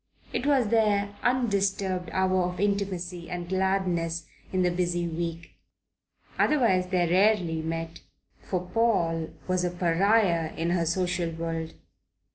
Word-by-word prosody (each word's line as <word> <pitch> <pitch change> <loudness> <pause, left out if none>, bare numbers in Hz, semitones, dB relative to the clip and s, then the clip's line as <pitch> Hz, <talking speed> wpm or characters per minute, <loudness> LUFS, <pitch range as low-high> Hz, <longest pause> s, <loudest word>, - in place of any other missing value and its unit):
It 270 - -1
was 265 -7 +3
their 205 -2 +2
undisturbed 200 -7 0
hour 185 -1 +2
of 180 0 -4
intimacy 185 -4 -2
and 175 -1 -4
gladness 180 -3 0 0.3
in 185 -1 +1
the 180 - +2
busy 175 -1 -1
week. 170 0 -4 0.9
Otherwise 225 -11 +3
they 180 -2 +1
rarely 180 -3 +3
met, 165 +1 -4 0.4
for 185 -2 -2
Paul 170 -7 +1 0.2
was 185 -1 +1
a 180 - +1
pariah 175 -1 +2
in 170 +1 -1
her 170 -2 +1
social 180 0 0
world. 165 0 -4
180 Hz, 125 wpm, -27 LUFS, 170-200 Hz, 0.9 s, was